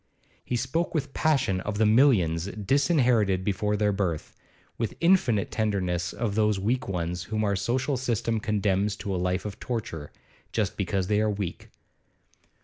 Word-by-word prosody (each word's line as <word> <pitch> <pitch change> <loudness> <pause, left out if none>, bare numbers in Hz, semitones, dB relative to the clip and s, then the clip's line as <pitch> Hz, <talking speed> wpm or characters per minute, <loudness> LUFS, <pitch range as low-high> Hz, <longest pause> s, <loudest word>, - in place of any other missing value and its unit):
He 125 - -2
spoke 140 +9 -1
with 140 -3 -2
passion 135 -12 +1
of 105 +1 -4
the 110 - +3
millions 105 - +4
disinherited 115 - +2
before 105 +1 0
their 105 0 +2
birth, 95 -6 -2 0.4
with 115 -2 -2
infinite 165 - +3
tenderness 90 -5 -1
of 115 -3 -2
those 105 -1 +2
weak 120 +6 -1
ones 90 -1 -3
whom 110 +1 -2
our 100 -1 +1
social 125 +7 0
system 115 -2 -1
condemns 105 -1 0
to 100 -1 -4
a - - 0
life 90 +1 -1
of 105 -2 -6
torture, 90 -11 -4 0.4
just 105 -4 -1
because 95 -1 -1
they 105 +2 +2
are 110 - +2
weak. 100 -4 -4
105 Hz, 155 wpm, -27 LUFS, 95-120 Hz, 0.4 s, millions